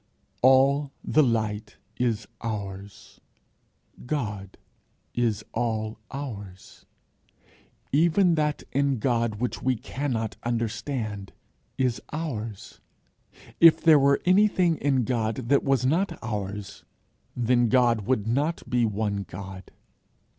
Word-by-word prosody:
All 135 +2 +4
the 155 - +3
light 110 -4 -1 0.2
is 115 -4 -1 0.2
ours. 100 -3 -7 0.9
God 105 -9 -4 0.6
is 115 -4 0
all 110 -1 -2
ours. 105 -9 -8 1.0
Even 170 +5 +4
that 150 -2 0
in 140 -1 +1
God 115 -2 0
which 120 +4 -3
we 130 0 +1
cannot 120 -2 -3
understand 115 -3 -3 0.4
is 125 -3 0
ours. 115 -10 -5 0.8
If 165 -1 +8
there 160 -3 +6
were 140 0 +3
anything 185 -3 +4
in 135 -3 +1
God 115 -2 -1
that 140 - +4
was 135 -3 +1
not 170 +4 +1
ours, 105 -3 -5 0.5
then 120 0 +2
God 120 -4 +3
would 125 -6 +1
not 145 +8 -1
be 120 -1 +2
one 105 -2 -1
God. 95 0 -9
120 Hz, 105 wpm, -26 LUFS, 105-140 Hz, 1.0 s, If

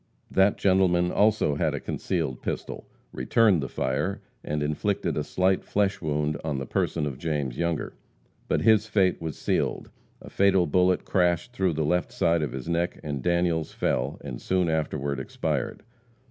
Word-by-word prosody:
That 95 +1 +3
gentleman 90 -2 +3
also 105 -7 +3
had 70 - 0
a - - -3
concealed 65 - -3
pistol, - - -5 0.2
returned 105 -8 +3
the 70 - -4
fire 70 +10 -1 0.2
and 75 0 -2
inflicted 85 +4 -1
a 75 - -1
slight 95 +3 +1
flesh 100 -1 0
wound 75 -2 -1
on 75 -4 -2
the 65 - -3
person 75 +4 -1
of 70 -3 -5
James 75 -6 -2
Younger. 85 -2 -1 0.5
But - - +1
his 110 -1 +4
fate 95 -5 +2
was 80 -3 -4
sealed. - - -1 0.3
A - - -12
fatal 95 -2 +3
bullet 90 +3 +2
crashed 90 +5 +1
through 95 -6 +1
the 80 0 -1
left 90 +3 0
side 85 -1 +2
of 75 - -1
the 65 +5 -5
neck, 85 +1 -1
and 70 -3 -3
Daniels 85 0 0
fell, - - -1
and - - -7
soon 90 -2 +1
afterward 70 -3 -1
expired. 65 - -3
85 Hz, 165 wpm, -26 LUFS, 75-95 Hz, 0.5 s, his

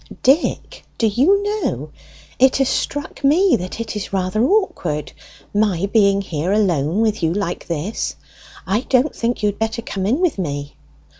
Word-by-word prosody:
"Dick, 275 +6 +1
do 230 - +1
you 285 - +3
know, 420 +1 -2 0.5
it 260 +1 +5
has 270 -1 +2
struck 290 0 -3
me 340 +7 +4
that 185 +4 -6
it 230 -1 -4
is 205 -2 -5
rather 195 +3 0
awkward, 245 - 0 0.4
my 205 -4 +1
being 200 -3 +4
here 165 0 -2
alone 180 -3 +1
with 215 -3 +1
you 165 -1 +1
like 190 -1 -3
this. 170 +6 -3 0.5
I 210 +4 +1
don't 260 +3 +2
think 235 -1 -2
you - - +4
had 205 - -6
better 225 +1 -2
come 195 -4 -3
in 255 +9 +1
with 355 - +1
me." 145 -4 -4
215 Hz, 165 wpm, -20 LUFS, 185-265 Hz, 0.5 s, it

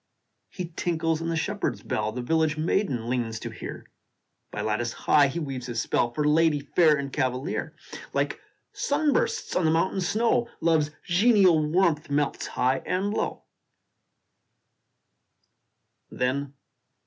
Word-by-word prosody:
He 180 -3 -6
tinkles 165 -2 0
in 165 - -2
the 165 - -1
shepherd 155 - -1
s - - -17
bell 105 0 -1
The 125 +2 -5
village 160 +2 +1
maiden 155 - 0
leans 120 -3 -2
to - - -5
hear - - -8 0.6
By - - -5
lattice 110 +2 -1
high 145 -2 +4
he 140 - -5
weaves 135 -6 -4
his 120 -2 -3
spell, 120 - +1
For 150 +4 0
lady 155 0 +3
fair 155 +2 +3
and 140 -1 -5
cavalier: 130 -1 -2 0.4
Like - - -1 0.3
sun 290 +1 +1
bursts 465 -2 -1
on 180 - +2
the 160 - +3
mountain 170 +4 +1
snow, 230 +5 +1
Love 165 -1 +3
s 150 - -2
genial 185 -4 +4
warmth 160 -3 +2
melts 145 0 -1
high 130 +1 +1
and 195 +3 -1
low. - - -2
155 Hz, 140 wpm, -26 LUFS, 135-180 Hz, 0.6 s, high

